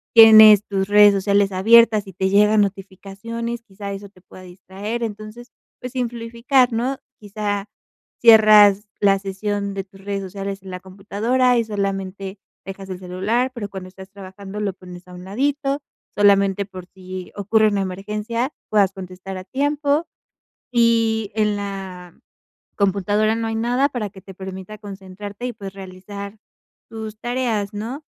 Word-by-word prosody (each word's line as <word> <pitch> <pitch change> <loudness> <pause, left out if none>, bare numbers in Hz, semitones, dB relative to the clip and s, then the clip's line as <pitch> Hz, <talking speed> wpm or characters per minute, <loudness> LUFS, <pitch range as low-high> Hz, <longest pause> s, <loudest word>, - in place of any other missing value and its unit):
tienes 220 -2 +9
tus 195 -1 -2
redes 205 0 +7
sociales 200 0 +2
abiertas 215 +2 +5
y 195 - -10
te 190 +2 -1
llegan 210 +2 +4
notificaciones, 200 +4 -5
quizá 200 -2 -8
eso 200 +1 -8
te 185 -2 -23
pueda 185 0 -15
distraer. 195 +5 -6
Entonces, 215 +2 -7 0.3
pues, 250 - -6
simplificar, 240 +1 0
¿no? 250 +4 -1 0.2
Quizá 205 -1 -4 0.5
cierras 215 -2 +7
la 195 -1 +3
sesión 200 +1 -3
de 195 - -3
tus 195 0 -18
redes 200 0 -3
sociales 195 0 -6
en 190 - -9
la 180 - -6
computadora 215 +7 0
y 230 - +2
solamente 195 -1 -4 0.3
dejas 195 0 -8
el 185 -1 -6
celular, 195 +8 -1
pero 205 -4 -5
cuando 190 -2 -8
estás 190 +1 -13
trabajando, 195 +1 -9
lo 200 -2 -1
pones 180 -1 -13
a 180 - -13
un 180 0 -10
ladito, 275 +7 -1 0.4
solamente 200 -1 +3
por 185 -2 -10
si 185 -1 -9
ocurre 215 +2 +2
una 200 -1 -1
emergencia, 210 +7 -3 0.2
puedas 200 -3 +3
contestar 185 0 -8
a 185 - -7
tiempo, 290 - 0 0.6
y 230 -3 +2
en 210 -1 +1
la 190 -3 -7 0.6
computadora 205 +2 +1
no 225 0 -2
hay 225 - -3
nada 245 +5 +1
para 225 -6 -4
que 190 - -14
te 190 - -12
permita 190 +2 -8
concentrarte 200 +2 -8
y, 250 - -4
pues, 195 -3 -8
realizar 195 +2 -9 0.5
tus 220 -1 -7
tareas, 240 -4 -2
¿no? 240 +8 -6
205 Hz, 150 wpm, -21 LUFS, 195-225 Hz, 0.6 s, tienes